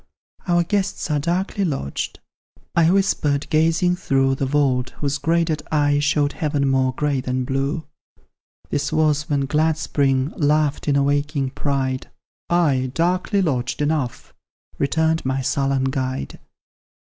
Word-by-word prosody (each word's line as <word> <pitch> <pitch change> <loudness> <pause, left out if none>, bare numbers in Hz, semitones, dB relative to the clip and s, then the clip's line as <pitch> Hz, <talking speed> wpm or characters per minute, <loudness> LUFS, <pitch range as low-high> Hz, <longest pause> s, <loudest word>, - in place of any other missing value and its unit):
"Our 175 -1 +3
guests 195 -3 -1
are 150 - +2
darkly 185 +6 -1
lodged," 135 - -3 0.5
I 165 -1 +5
whisper'd, 165 -7 +1
gazing 165 +3 +2
through 135 -6 +1
The 135 0 -1
vault, 130 -3 +1
whose 145 -1 -2
grated 160 0 +1
eye 145 -1 +2
showed 145 0 +1
heaven 145 -3 0
more 130 -1 +2
gray 145 -2 0
than 130 0 -2
blue; 140 +5 -2 0.9
(This 145 0 -1
was 150 0 +1
when 145 -2 +1
glad 155 +3 +1
Spring 135 -2 0
laughed 150 -1 +1
in 145 - +3
awaking 140 -1 0
pride;) 135 -2 -2 0.4
"Ay, 145 -7 +2
darkly 180 +4 +1
lodged 125 -7 -1
enough!" 145 -4 -2 0.5
returned 160 +3 +1
my 130 0 -1
sullen 135 0 0
guide. 130 -1 -3
145 Hz, 130 wpm, -21 LUFS, 135-160 Hz, 0.9 s, I